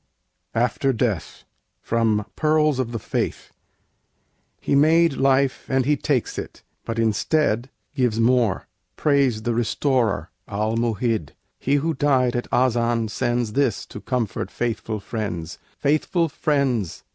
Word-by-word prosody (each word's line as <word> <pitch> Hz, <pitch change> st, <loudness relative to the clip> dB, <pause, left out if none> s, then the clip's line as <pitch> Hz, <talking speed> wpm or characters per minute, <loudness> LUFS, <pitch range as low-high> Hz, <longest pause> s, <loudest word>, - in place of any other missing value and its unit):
AFTER 125 Hz, +3 st, +1 dB
DEATH 110 Hz, -, -2 dB, 0.4 s
From 110 Hz, -2 st, +1 dB
'Pearls 155 Hz, -3 st, +2 dB
of 125 Hz, -3 st, -1 dB
the 115 Hz, -, -3 dB
Faith' -, -, -3 dB, 1.1 s
He -, -, -2 dB
made 160 Hz, +3 st, +5 dB
life 135 Hz, 0 st, +1 dB
and 130 Hz, -1 st, +2 dB
He 150 Hz, +2 st, +3 dB
takes 135 Hz, -3 st, -1 dB
it -, -, -9 dB, 0.2 s
but 115 Hz, -, -3 dB
instead 115 Hz, +2 st, +1 dB, 0.2 s
Gives 125 Hz, -6 st, +1 dB
more: 115 Hz, -4 st, +2 dB, 0.3 s
praise 140 Hz, -7 st, +2 dB
the 120 Hz, -, 0 dB
Restorer, 115 Hz, -, 0 dB, 0.2 s
Al 105 Hz, +2 st, -1 dB
Mu'hid! 115 Hz, -, -1 dB, 0.3 s
He 140 Hz, -, +1 dB
who 160 Hz, +3 st, +1 dB
died 130 Hz, -4 st, +2 dB
at 120 Hz, -, -3 dB
Azan 120 Hz, -2 st, +2 dB
sends 120 Hz, -1 st, -1 dB
This 135 Hz, -6 st, +1 dB
to 105 Hz, -, -10 dB
comfort 115 Hz, -7 st, -2 dB
faithful 110 Hz, -2 st, -3 dB
friends: 100 Hz, -6 st, -5 dB, 0.2 s
Faithful 160 Hz, +3 st, +1 dB
friends! 140 Hz, -, 0 dB
120 Hz, 125 wpm, -23 LUFS, 110-140 Hz, 1.1 s, made